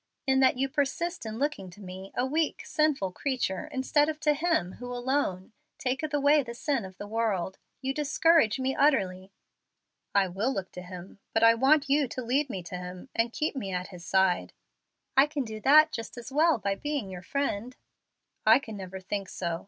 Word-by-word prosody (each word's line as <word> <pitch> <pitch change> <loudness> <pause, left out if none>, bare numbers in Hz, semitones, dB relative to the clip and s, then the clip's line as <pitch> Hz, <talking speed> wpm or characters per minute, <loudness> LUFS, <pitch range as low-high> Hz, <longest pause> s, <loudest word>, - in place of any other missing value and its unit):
In 265 -1 +3
that 260 -1 +4
you 270 +1 +1
persist 295 +2 -2
in 220 0 -5
looking 270 -9 -2
to 185 +4 -15
me, 190 0 -9
a 250 - +1
weak, 310 +4 -1
sinful 300 - +1
creature, 250 -5 -2
instead 290 +3 +2
of 305 -1 -4
to 300 -1 +3
Him 310 - 0
who 245 - -5
alone 245 -7 -1 0.2
'taketh 265 +4 -2
away 290 +1 +4
the 235 -3 -7
sin 270 -4 -1
of 185 0 -11
the - - -6
world,' 205 -4 -1 0.2
you 265 +1 0
discourage 300 -4 +3
me 265 +1 0
utterly." 195 -10 +1 0.8
"I 200 -1 +4
will 200 +8 -1
look 195 -7 -4
to 180 - -8
Him, 180 +1 -10 0.2
but 225 - +3
I 230 0 +8
want 275 +5 +3
you 280 0 +3
to 255 +1 -5
lead 270 +4 +1
me 185 -7 -5
to 180 +1 -6
Him, 180 +6 -8
and 230 0 +1
keep 305 +4 -2
me 200 -8 -4
at 180 0 -3
His 180 -3 -11
side." 190 0 +1 0.6
"I 270 +2 +6
can 295 -2 -2
do 220 -2 -7
that 300 +6 +6
just 230 +1 -6
as 240 +2 -8
well 315 +1 +4
by 200 -2 -1
being 275 -2 -3
your 180 -1 -7
friend." 250 0 -2 0.7
"I - - +7
can 225 -6 -7
never 190 -1 -7
think 195 +1 -4
so. 170 -2 -3
245 Hz, 200 wpm, -28 LUFS, 190-285 Hz, 0.8 s, I